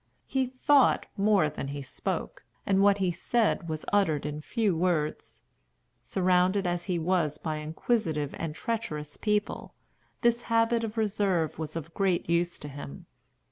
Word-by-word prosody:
He 265 -1 0
thought 260 +2 +3
more 200 -5 +3
than 150 -2 -5
he 140 0 -5
spoke, 130 - -4 0.2
and 195 -1 +3
what 200 0 +5
he 190 -2 +1
said 205 -1 0
was 155 -1 -4
uttered 160 -9 +2
in 150 0 -4
few 210 +1 0
words. 160 -3 -1 0.6
Surrounded 185 +6 +2
as 175 0 -1
he 180 -3 0
was 165 -3 +1
by 155 -1 -3
inquisitive 155 - -1
and 160 -2 -3
treacherous 160 -10 -3
people, 210 -1 -1 0.5
this 235 0 +3
habit 230 0 +3
of 225 0 -4
reserve 195 -8 0
was 155 -1 -5
of 165 0 -6
great 190 -3 +1
use 170 +1 +1
to 150 - -8
him. 135 - -9
180 Hz, 150 wpm, -28 LUFS, 155-210 Hz, 0.6 s, what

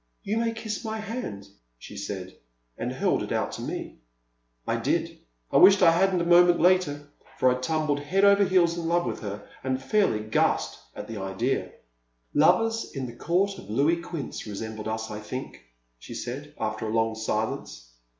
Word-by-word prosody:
''You 215 +3 0
may 230 0 +1
kiss 220 -1 -5
my 220 -1 -3
hand," 215 - -5 0.3
she - - -11
said, 95 -2 -6 0.4
and - - -3
held - - +1
it - - -5
out - - 0
to - - -6
me. - - -5 0.7
I - - 0
did. - - -1 0.3
I - - +4
wished 195 +1 +7
I 165 - +8
had 190 +4 +3
n't 175 - +1
a - - -3
moment 175 0 +6
later, 170 -6 +2 0.3
for 130 - +4
I 125 - -1
tumbled 150 +1 0
head 185 +8 +2
over 200 0 +6
heels 180 -3 +3
in 170 -1 -3
love 175 +1 +2
with - - -3
her 100 -1 -6 0.2
and 130 0 -1
fairly 135 - +1
gasped 110 0 0 0.2
at 105 - -7
the 115 - -6
idea. 95 +7 -2 0.6
I/)vers 225 +9 +3
in 135 -1 -3
the 120 -1 -8
Court 190 +8 0
of 100 - -13
Louis 150 +10 +2
Quinze 170 -4 -5
resem 110 +2 -5
bled 110 0 -6
us, 110 0 -3
I 105 - -5
think," 115 - -7 0.4
she - - -9
said, 145 +5 -6
after 110 0 -2
a - - -3
long 115 0 +1
silence. 110 - -3
145 Hz, 190 wpm, -26 LUFS, 110-185 Hz, 0.7 s, I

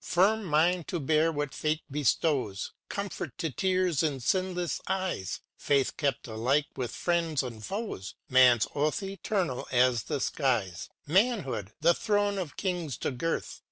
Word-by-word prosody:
Firm 205 +4 +3
mind 170 +2 +2
to 175 - -2
bear 155 +3 +3
what 145 -3 -3
fate 155 +1 -1
bestows; 135 -6 0 0.2
Comfort 200 0 -4
to 165 -4 -2
tears 185 -1 +1
in 145 -4 0
sinless 180 +3 0
eyes; 185 - -2
Faith 140 -2 +1
kept 140 -5 -1
alike 125 +6 +1
with 125 -3 -2
friends 165 -1 0
and 115 -4 -7
foes; 195 - -5
Man's 125 -3 +6
oath 150 +6 0
eternal 195 -7 -2
as 125 -2 +4
the 150 -3 -2
skies; 120 - -1 0.2
Manhood, 165 - +1
â - - -24
the 170 +2 +6
thrones 205 +1 +1
of 170 -6 -5
Kings 175 - -2
to - - -2
girth. 165 +6 -3
155 Hz, 150 wpm, -29 LUFS, 130-185 Hz, 0.2 s, Man's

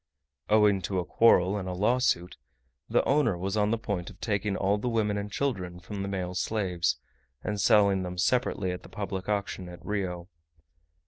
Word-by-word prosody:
Owing 105 -2 +4
to 95 - -1
a 90 - 0
quarrel 95 +1 +4
and 95 -2 -4
a - - -3
lawsuit, 100 -3 +1 0.5
the - - +3
owner 135 -9 +2
was 95 +3 -2
on 105 -1 +2
the 115 - +1
point 100 -6 -3
of - - -15
taking 100 -2 -1
all 100 +1 +1
the 125 - -1
women 110 -3 +1
and 100 0 -4
children 95 -11 -2
from 100 +3 -6
the 100 - -3
male 90 -2 -3
slaves, 90 -3 0 0.5
and 105 -2 -2
selling 100 0 +4
them 90 0 -5
separately 100 -2 +1
at 90 - -5
the - - -14
public 95 -1 -5
auction 100 -3 -2
at 90 -1 -12
Rio. 90 -4 -3
100 Hz, 185 wpm, -28 LUFS, 90-105 Hz, 0.5 s, Owing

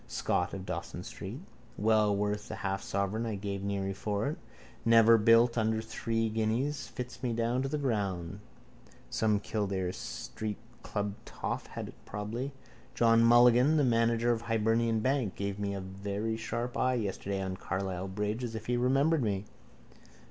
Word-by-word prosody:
Scott 90 - 0
of 95 -1 -6
Dawson 90 0 -5
street. 105 - -7 0.4
Well 105 -1 +3
worth 105 +1 -1
the - - -5
half 95 0 -2
sovereign 100 +4 -1
I 110 - -2
gave 100 0 -4
Neary 100 -1 -2
for 105 +1 -1
it. 155 - -4 0.5
Never 115 0 +7
built 115 +2 +5
under 110 0 +1
three 115 0 -1
guineas. 115 +7 -1
Fits 125 0 -7
me 125 -3 -1
down 115 +2 0
to 135 - -1
the 150 - -1
ground. 100 - -2 0.7
Some 105 -2 +2
Kildare 100 -3 -1
street 105 +2 -5 0.2
club 105 -1 -2
toff - - -4
had - - -6
it - - -11
probably. 110 +7 -4 0.4
John 115 -1 +5
Mulligan, 120 +5 +6
the 150 - +4
manager 115 -1 +3
of 115 - +1
the 115 - -12
Hibernian 115 0 +2
bank, 130 -5 0
gave 100 0 -3
me 100 -1 -2
a 100 - -4
very 100 +4 -3
sharp 115 +2 -3
eye 130 0 +2
yesterday 100 -3 -2
on 95 -1 -3
Carlisle 95 0 -3
bridge 105 +5 -2
as 115 -2 -4
if 110 0 -6
he 120 +1 0
remembered 135 +5 +3
me. 100 -3 -1
110 Hz, 165 wpm, -31 LUFS, 100-115 Hz, 0.7 s, Never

